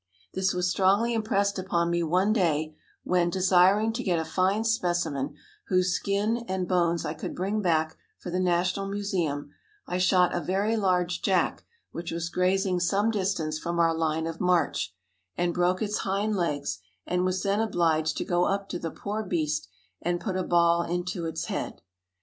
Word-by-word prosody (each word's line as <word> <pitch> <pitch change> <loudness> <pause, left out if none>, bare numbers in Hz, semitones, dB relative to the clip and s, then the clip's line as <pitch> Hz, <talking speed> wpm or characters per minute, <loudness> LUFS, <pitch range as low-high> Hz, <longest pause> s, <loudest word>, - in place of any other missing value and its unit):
This 190 0 +1
was 180 0 0
strongly 200 +6 +2
impressed 200 -3 0
upon 170 -2 0
me 170 0 +1
one 180 +6 +2
day 155 -6 0 0.3
when, 180 -1 +2
desiring 190 +4 +4
to 240 - -3
get 185 -7 +1
a 160 - -1
fine 190 +6 +1
specimen, 175 -10 0 0.3
whose 185 -1 +2
skin 205 +5 0
and 185 -1 -2
bones 170 -2 +1
I 150 - -2
could - - -6
bring 200 +4 -1
back 160 -4 +1 0.2
for 175 - -7
the 180 - 0
National 180 +2 +1
Museum, 180 -8 -2 0.3
I 180 - -2
shot 180 -1 +4
a 175 - 0
very 200 +5 0
large 180 -4 +1
jack 190 -2 +1 0.3
which 170 0 -6
was 165 0 -3
grazing 185 0 +1
some 200 +5 +2
distance 185 -7 -1
from 170 +1 -3
our 165 -1 +3
line 160 0 0
of 165 0 -5
march, 175 - +1 0.5
and 175 -1 +1
broke 180 +3 +1
its 210 0 -1
hind 205 +2 0
legs, 150 -6 -1 0.3
and 180 0 0
was 185 0 0
then 200 +1 +1
obliged 165 -7 +1
to - - -2
go 175 0 +2
up 200 0 -1
to 175 - -3
the 165 - -3
poor 205 +6 -4
beast 155 - -1 0.3
and 175 +1 -1
put 190 -1 -3
a 185 - 0
ball 170 -1 +3
into 175 0 -3
its 160 0 -3
head. - - -4
180 Hz, 180 wpm, -27 LUFS, 170-195 Hz, 0.5 s, desiring